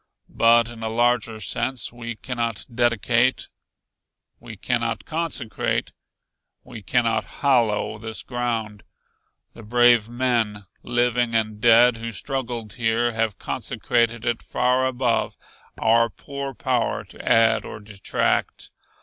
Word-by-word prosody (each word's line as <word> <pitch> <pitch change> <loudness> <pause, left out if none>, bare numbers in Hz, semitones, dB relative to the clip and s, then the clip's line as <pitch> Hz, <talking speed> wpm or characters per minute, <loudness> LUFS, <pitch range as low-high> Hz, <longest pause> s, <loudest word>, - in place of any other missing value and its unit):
"But 115 0 +5
in 115 -1 -11
a 110 - -2
larger 115 -1 +1
sense, 115 +5 -2
we 120 -1 -6
cannot 115 -2 -3
dedicate 120 +1 +1 0.9
we 115 -3 -10
cannot 120 +2 -1
consecrate 155 -8 -2 0.7
we 110 - -10
cannot 115 +1 +1
hallow 115 -7 0
this 110 0 -5
ground. 115 -4 -3 0.7
The - - -12
brave 120 0 +4
men, 120 -4 -1 0.2
living 120 -1 0
and 110 -1 0
dead, 120 +1 +6
who 115 0 -5
struggled 120 -3 -4
here 120 0 +1
have 110 -3 -1
consecrated 115 -1 -1
it 120 -1 -1
far 125 +1 +1
above 125 -2 -1 0.4
our 115 +1 +3
poor 140 +6 -7
power 120 - -1
to - - -13
add 115 -1 +4
or - - -8
detract. 105 -2 -2
115 Hz, 115 wpm, -23 LUFS, 110-120 Hz, 0.9 s, dead